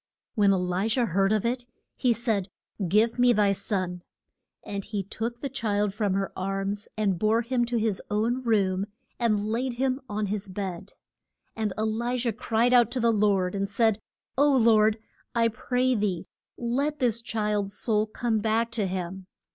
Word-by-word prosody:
When 205 -3 +4
E - - +4
li 180 +2 0
jah 235 +2 +2
heard 195 0 +2
of 215 0 +1
it, 245 +1 -1 0.3
he 250 - +2
said, 220 -5 0 0.4
Give 220 +6 +2
me 245 0 +6
thy 205 -2 +3
son. 185 -3 -2 0.6
And 200 -1 -4
he 205 -1 -3
took 230 +5 -5
the 280 - -1
child 210 -6 0
from 205 -2 0
her 195 0 -2
arms 195 +2 -3
and 195 -5 +1
bore 220 +2 +2
him 240 0 +1
to 240 0 -1
his 220 -3 0
own 230 +5 0
room, 200 -5 +1 0.3
and 225 -3 +2
laid 240 +3 -1
him 260 +2 0
on 210 0 -1
his 200 0 -3
bed. 190 -1 -5 0.6
And 220 -2 -1
E 215 - 0
li 235 +3 -1
jah 240 -1 0
cried 235 +1 +1 0.2
to 255 - -2
the 230 -1 +3
Lord, 200 -4 +2
and 200 0 -1
said, 220 0 +2 0.4
O 290 0 +5
Lord, 220 -4 +4 0.4
I 230 -1 +4
pray 250 +3 0
thee 195 -6 -1 0.3
let 275 +6 -1
this 235 -4 +1
child's 210 -3 -2
soul 215 -2 +1
come 220 0 -1
back 225 +2 +1
to 220 -4 0
him. 185 0 -5
215 Hz, 175 wpm, -27 LUFS, 200-235 Hz, 0.6 s, me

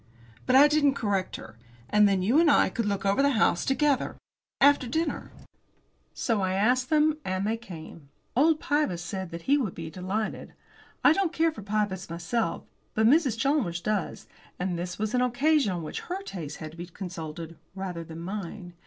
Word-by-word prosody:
But 255 - +4
I 280 +2 +9
didn't 295 -2 +3
correct 200 -6 -1
her. 115 0 -11 0.3
"And 210 -1 +5
then 190 -2 +1
you 240 +11 +4
and 335 -2 +5
I 285 - +5
could 230 -3 -2
look 200 -1 -2
over 200 +6 +3
the 280 0 +3
house 175 -5 +3
together 280 0 +1 0.4
after 280 -2 +5
dinner." 320 +7 -2 0.8
So 225 -4 0
I 185 0 0
asked 250 +6 +2
them. 310 0 +3
And 185 -2 -2
they 220 +2 +1
came. 165 -9 -11 0.3
Old 310 +4 +4
Pybus 290 - 0
said 190 0 -5
he 285 +2 +3
would 215 -10 -2
be 165 -1 -6
delighted. 190 +5 -4 0.5
I 295 - +7
don't 375 -2 0
care 325 0 +2
for 295 - -10
Pybus 205 -3 -2
myself, 170 +4 -2 0.3
but 220 - +3
Mrs. 270 -1 +4
Chalmers 230 - +1
does, 205 +1 -2 0.3
and 180 0 -2
this 175 0 -4
was 215 +1 -2
an 250 - +2
occasion 270 0 +2
on 175 -2 -3
which 155 - -5
her 375 +2 -5
taste 160 - -6
had 155 -1 -7
to 165 - -15
be 175 +1 -6
consulted 170 -3 -7 0.2
rather 185 -3 -5
than 165 0 -9
mine. 185 -1 -6
210 Hz, 185 wpm, -27 LUFS, 175-275 Hz, 0.8 s, I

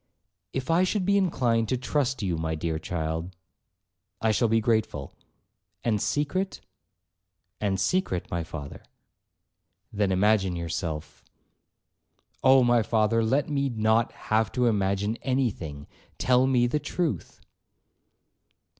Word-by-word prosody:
'If 135 +4 -2
I 170 +3 +4
should 185 0 0
be 200 +1 +3
inclined 120 - +1
to 130 - +1
trust 130 -1 -1
you, 90 -3 0
my 80 0 -2
dear 80 0 -2
child,'—'I 85 +6 -5
shall 115 +2 +2
be 115 +1 +3
grateful.' 110 - -1 0.7
'And 110 -4 +1
secret.' 185 +7 -1 1.0
'And 100 -2 0
secret, 95 - 0
my 85 -1 -1
father.' 75 -3 -8 1.1
'Then 100 -2 +1
imagine 95 -1 +2
yourself'—'Oh! 85 - -3
my 120 -1 +4
father, 110 +1 +2
let 135 +6 +1
me 140 -2 0
not 110 0 +2 0.2
have 110 -2 +3
to 125 -1 +1
imagine 100 0 +1
any 130 -2 0
thing—tell 90 - -2
me 125 -2 +3
the 135 +5 0
truth.' 145 - -3
110 Hz, 115 wpm, -27 LUFS, 90-130 Hz, 1.1 s, I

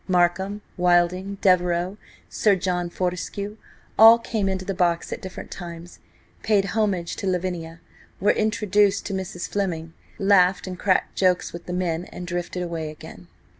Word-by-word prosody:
Markham, 190 +3 +1
Wilding, 180 +2 +2
Devereux, 180 0 +2 0.3
Sir 205 -2 +2
John 180 -1 -1
Fortescue–all 200 +5 +2
came 220 -4 -2
into 190 -1 -3
the 195 - -2
box 175 -2 0
at - - -7
different 190 -3 -8
times, 170 -1 -9 0.4
paid 205 -3 +2
homage 195 -5 -1
to 195 - -3
Lavinia, 175 -2 -3 0.4
were 205 - +4
introduced 210 -2 +2
to 200 - -4
Mrs. 185 -2 -4
Fleming, 165 -5 -3 0.2
laughed 195 -2 +4
and 185 -2 -6
cracked 185 -2 +1
jokes 185 -2 +1
with 170 - -9
the 180 - -4
men, 175 -1 -1
and 180 - -8
drifted 175 +1 -3
away 165 -3 -4
again. 155 - -12
185 Hz, 145 wpm, -24 LUFS, 175-200 Hz, 0.4 s, were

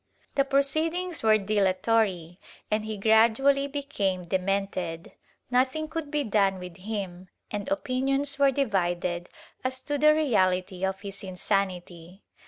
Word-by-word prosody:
The 275 - +3
pro 275 0 +3
ceedings 325 +5 -1
were 220 -1 +5
dilatory 195 -3 +1 0.3
and 215 0 0
he 215 -1 -4
gradually 230 +7 +4
became 215 -11 -2
demented; 185 -2 -2 0.4
nothing 260 +5 +1
could 315 -1 -5
be 295 -1 0
done 200 -4 +2
with 180 -1 -9
him 190 -3 -5 0.2
and 210 +6 -4
opinions 275 0 0
were 280 -1 +6
divided 180 -9 -1 0.3
as 260 0 -2
to 290 -1 -2
the 305 +1 +6
reality 185 -10 +1
of 190 0 -1
his 200 0 -7
insanity. 185 -1 -3
215 Hz, 130 wpm, -27 LUFS, 185-275 Hz, 0.4 s, were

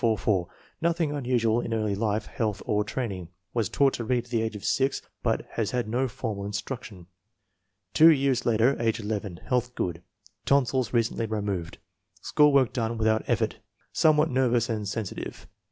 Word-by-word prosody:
Nothing 165 -2 +1
unusual 120 -5 +1
in 115 - -2
early 110 -2 0
life, 105 +1 -1
health, 105 -3 -3
or 105 0 +1
training. 105 -6 -4 0.3
Was 115 -3 0
taught 140 -1 +3
to 120 - -3
read 120 +1 0
at - - -18
the 115 -2 +1
age 110 -1 -2
of 105 0 -7
6, 135 +5 +1 0.2
but - - 0
has 110 -3 -1
had 125 -3 -1
no 125 +4 0
formal 110 -3 -4
instruction. 105 -2 -6 0.9
Two 160 +1 +8
years 135 -5 +3
later, 120 +4 +3
age 115 -1 +1
11. 105 -4 -4
Health 125 -1 0
good. 85 -1 -2 0.4
Tonsils 130 -2 +2
recently 115 -1 0
removed. 100 -6 -3 0.4
School 150 0 +4
work 135 -4 +3
done 115 -2 -1
without 110 0 +2
effort. 115 -2 0 0.3
Somewhat 155 -1 +4
nervous 125 -2 +2
and 105 -3 -2
sensitive. 100 -1 -5
115 Hz, 160 wpm, -27 LUFS, 105-130 Hz, 0.9 s, Two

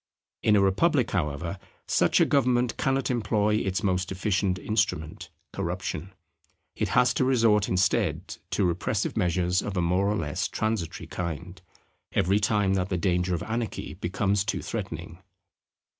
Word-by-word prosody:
In 105 - +4
a 100 - +5
republic, 125 - +2
however, 85 +1 -2 0.3
such - - +3
a - - +6
government 125 -3 +2
cannot 135 0 0
employ 105 -2 +1
its 95 -1 -1
most 95 -1 0
efficient 95 -1 0
instrument, 105 -7 -2 0.2
corruption. 95 - -4 0.6
It - - -1
has 125 0 +5
to - - +1
resort 115 -5 +3
instead 95 0 0
to 100 - +1
repressive 85 0 -1
measures 90 +1 +1
of 100 -2 -4
a - - +2
more 90 +3 +2
or 105 - +1
less 75 -7 -2
transitory 110 -6 -2
kind, 90 +1 -5 0.5
every 95 +4 +2
time 105 -3 +2
that 95 -1 0
the 90 - 0
danger 90 0 +1
of 85 - -4
anarchy 115 0 -3
becomes 100 +2 0
too 100 - -2
threatening. - - -5
95 Hz, 145 wpm, -27 LUFS, 90-110 Hz, 0.6 s, a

